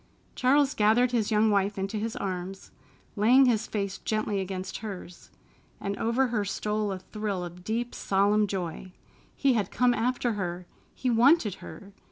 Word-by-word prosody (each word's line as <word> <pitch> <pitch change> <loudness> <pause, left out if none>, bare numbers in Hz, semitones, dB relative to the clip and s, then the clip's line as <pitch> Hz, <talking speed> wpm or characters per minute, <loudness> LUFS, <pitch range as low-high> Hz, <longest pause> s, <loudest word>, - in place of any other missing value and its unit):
Charles 275 +2 +3
gathered 225 +4 +3
his 230 -4 0
young 215 0 +3
wife 200 0 +1
into 195 +3 -2
his 220 +2 -3
arms, 190 0 -5 0.4
laying 245 +6 +5
his 225 -3 +1
face 200 -2 -3
gently 215 -2 -1
against 190 0 -5
hers, 190 -5 -8 0.5
and 200 0 -3
over 240 +3 +1
her 225 -3 0
stole 210 +1 -2
a 190 - -3
thrill 200 -1 -4
of 175 +1 -10
deep, 230 +4 -2
solemn 205 +2 +2
joy. 185 -1 -5 0.4
He 275 -2 +3
had 210 -5 0
come 250 -1 +2
after 245 0 0
her! 180 -3 -4 0.3
He 255 - -1
wanted 240 - +4
her! 200 0 -11
210 Hz, 160 wpm, -27 LUFS, 195-235 Hz, 0.5 s, laying